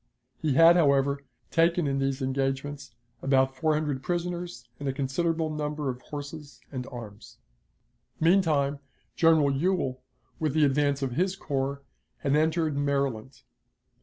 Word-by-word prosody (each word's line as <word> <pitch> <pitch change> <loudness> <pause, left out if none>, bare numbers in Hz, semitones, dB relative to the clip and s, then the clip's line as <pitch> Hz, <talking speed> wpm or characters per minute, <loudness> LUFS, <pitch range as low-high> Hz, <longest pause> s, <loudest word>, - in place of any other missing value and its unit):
He 150 -4 +1
had, 165 +3 +7
however, 140 -3 +3 0.3
taken 170 0 +3
in 135 -1 0
these 135 0 -1
engagements 135 0 -2 0.3
about 135 -1 +2
four 155 +3 +1
hundred 150 -4 -1
prisoners 175 -6 -3
and 140 -1 -2
a - - -1
considerable 155 +4 -1
number 150 -2 -2
of 125 0 -10
horses 145 0 -8
and 130 -2 -5
arms. 110 -5 -10 0.8
Meantime, 155 -5 +3 0.4
General 160 -4 +4
Ewell, 135 -4 0 0.4
with 155 -2 -1
the 155 -1 +5
advance 140 0 +1
of 130 - -1
his 180 +8 0
corps, 140 -4 -3 0.4
had 140 0 +1
entered 160 0 +1
Maryland. 140 -4 -2
145 Hz, 135 wpm, -27 LUFS, 135-160 Hz, 0.8 s, had